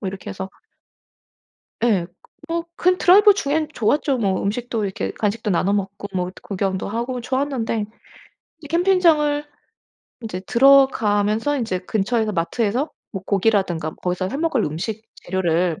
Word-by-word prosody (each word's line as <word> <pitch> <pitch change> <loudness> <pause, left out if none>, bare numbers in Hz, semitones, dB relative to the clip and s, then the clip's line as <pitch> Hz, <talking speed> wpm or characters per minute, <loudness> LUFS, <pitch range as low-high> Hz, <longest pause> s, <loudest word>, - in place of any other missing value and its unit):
뭐 195 - -3
이렇게 190 0 -7
해서 190 0 -6 1.4
예. 195 -8 +2
그 175 - -33 0.3
뭐 335 0 -2
그 365 +1 +3
드라이브 405 +4 +6
중엔 310 -4 -1
좋았죠. 270 +3 +1
뭐 195 -4 0
음식도 225 +1 -2
이렇게 195 -1 -3
간식도 210 0 -1
나눠 190 +2 +1
먹고 200 0 -3
뭐 180 0 -1
구경도 190 -1 -2
하고 240 +4 -3
좋았는데 250 -4 -1 0.8
이 295 - -10
캠핑장을 330 -4 +3 0.8
인제 215 -6 -5
들어가면서 235 -2 +4
인제 220 -8 -2
근처에서 215 +3 0
마트에서 220 - -1 0.2
뭐 195 -3 -6
고기라든가 195 -6 +1
거기서 180 +1 -2
해 275 - -4
먹을 305 -7 0
음식 200 +9 -4
재료를 175 -2 -1
220 Hz, 310 characters per minute, -21 LUFS, 190-275 Hz, 1.4 s, 드라이브